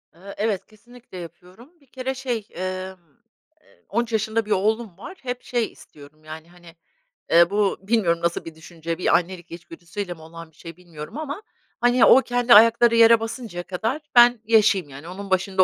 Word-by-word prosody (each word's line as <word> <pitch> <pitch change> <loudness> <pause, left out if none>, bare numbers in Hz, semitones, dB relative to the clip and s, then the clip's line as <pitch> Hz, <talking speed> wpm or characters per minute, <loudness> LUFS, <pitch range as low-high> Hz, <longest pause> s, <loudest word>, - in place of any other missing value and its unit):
Eee, 195 +4 -11
evet, 205 -3 -1
kesinlikle 235 -1 -16
yapıyorum. 180 - -12
Bir - - -25
kere 260 +1 -4
şey, 245 -5 -4
emm, 185 +1 -5 0.6
eee, - - -28
13 235 +2 -1
yaşında 220 +1 0
bir 215 - -8
oğlum 215 -1 0
var, 370 - -10
hep 250 -1 -5
şey 240 -3 -2
istiyorum 150 +1 -17
yani, 155 +1 -10
hani, 175 -1 -17 0.6
eee, 170 +1 +6
bu 205 0 0
bilmiyorum 195 -5 +1
nasıl 170 0 -2
bir 165 - -9
düşünce, 165 0 -7
bir 180 - +2
annelik 175 0 -7
içgüdüsüyle 175 +2 -7
mi 160 - -17
olan 165 0 -12
bir - - -31
şey 165 +1 -11
bilmiyorum 170 - -10
ama, 310 +3 -5 0.4
hani, 245 0 +4
o 265 - +7
kendi 245 -1 +2
ayakları 230 +2 +6
yere 230 0 +7
basıncaya 225 -5 -6
kadar 225 - -3
ben 240 0 +7
yaşayayım 210 -6 +3
yani 140 +4 -11
onun 195 +3 -8
başında 190 0 +2
195 Hz, 175 wpm, -23 LUFS, 170-230 Hz, 0.6 s, o